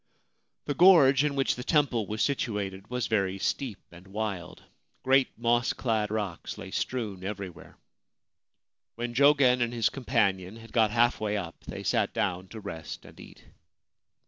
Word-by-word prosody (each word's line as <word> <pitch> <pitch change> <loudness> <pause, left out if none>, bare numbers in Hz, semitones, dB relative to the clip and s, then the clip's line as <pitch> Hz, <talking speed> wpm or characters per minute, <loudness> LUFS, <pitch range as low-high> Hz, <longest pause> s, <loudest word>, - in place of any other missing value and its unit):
The 145 - -1
gorge 145 -6 +6
in 145 -1 0
which 135 -1 +2
the 125 - -7
temple 130 - +1
was 110 +1 -1
situated 105 -7 -2
was 125 -1 -2
very 100 -3 0
steep 115 +2 -2
and 85 +2 -14
wild. 100 -3 -5 0.4
Great 135 0 +4
moss 120 +1 +2
clad 110 -4 -1
rocks 105 -5 -4
lay - - -8
strewn 105 -7 -3
every 100 -1 -4
where. - - -16 1.2
When 120 0 -4
Jogen 135 -2 +5
and 120 -1 +1
his 115 -2 +1
companion 105 -7 0
had 115 0 -13
got 110 -2 +4
half 120 +2 +2
way 105 -1 -1
up 85 -4 -6
they - - -7
sat - - 0
down 90 +1 -1
to 110 - -9
rest 80 -6 -7
and - - -15
eat. - - -14
115 Hz, 160 wpm, -28 LUFS, 100-125 Hz, 1.2 s, gorge